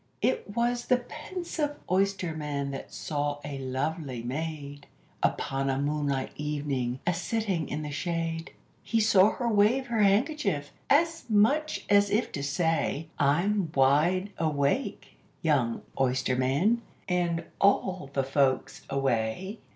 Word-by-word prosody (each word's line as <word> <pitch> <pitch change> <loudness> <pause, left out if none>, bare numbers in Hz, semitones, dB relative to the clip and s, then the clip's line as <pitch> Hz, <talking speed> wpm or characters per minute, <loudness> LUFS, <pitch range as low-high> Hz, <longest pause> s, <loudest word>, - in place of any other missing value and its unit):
It 465 - +1
was 240 +1 0
the 250 - +5
pensive 305 -2 -4 0.2
oysterman 160 -7 0
that 135 - -7
saw 145 -1 -2
a 140 -2 -5
lovely 135 -1 -3
maid, 145 +1 -5 0.3
Upon 135 0 0
a 135 - +1
moonlight 145 -1 -1
evening, 140 -4 -2
a 180 - +2
sitting 185 -2 -1
in 155 - -3
the 150 - -5
shade; 165 +1 -2 0.3
He 230 - 0
saw 210 -2 +6
her 240 - -2
wave 225 +4 +3
her 235 -3 0
handkerchief, 200 - +2 0.2
as 330 +3 +3
much 275 +9 +2
as 205 0 +5
if 210 +4 +1
to 140 - -4
say, 160 +1 0
"I'm 175 +5 +2
wide 155 +9 +3
awake, 155 - -1 0.2
young 135 -8 +1 0.2
oysterman, 135 - +2 0.3
and 175 -2 0 0.2
all 190 -5 +2
the 135 -1 0
folks 135 -1 +1
away." 135 - -1
160 Hz, 125 wpm, -28 LUFS, 140-205 Hz, 0.3 s, saw